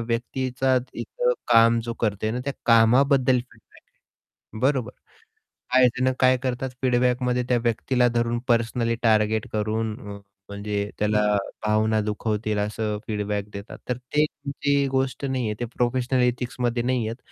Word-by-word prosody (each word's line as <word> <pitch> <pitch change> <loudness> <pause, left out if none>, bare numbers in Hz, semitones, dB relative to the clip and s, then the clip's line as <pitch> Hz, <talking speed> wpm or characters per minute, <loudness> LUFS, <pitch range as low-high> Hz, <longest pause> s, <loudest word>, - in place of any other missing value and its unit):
व्यक्तीचा 125 +3 -1 0.2
इथं - - -1 0.2
काम 115 0 +6
जो 115 - -4
करते 110 -1 0
ना 125 +3 -3
त्या 140 - -2
कामाबद्दल 125 +3 +4
फीडबॅक 120 +1 -13 0.5
आहे. 110 - -13
बरोबर? 130 -2 +1 0.8
काही 130 -1 +7
जण 130 +1 +1
काय 130 0 +5
करतात 130 +1 -2
फीडबॅकमध्ये 125 0 +1
त्या 125 - +3
व्यक्तीला 125 +2 +1
धरून 120 0 0
पर्सनली 115 0 +1
टार्गेट 110 -1 +2
करून 110 +1 -1
अ, 105 0 -8 0.4
म्हणजे 100 0 -3
त्याला 105 0 +2 0.4
भावना 110 +1 +2
दुखवतील 105 0 -2
असं 105 0 -2
फीडबॅक 105 -1 -2
देतात 100 +2 -8
तर 125 - 0
ते 130 +4 0
तुमची 140 -1 -1
गोष्ट 135 +1 -1
नाही 130 -3 -1
आहे. 105 - -1
ते 120 - -1
प्रोफेशनल 125 +1 +1
एथिक्समध्ये 120 -1 -1
नाही 125 -3 0
आहेत. 115 - -5
120 Hz, 140 wpm, -24 LUFS, 110-130 Hz, 0.8 s, काही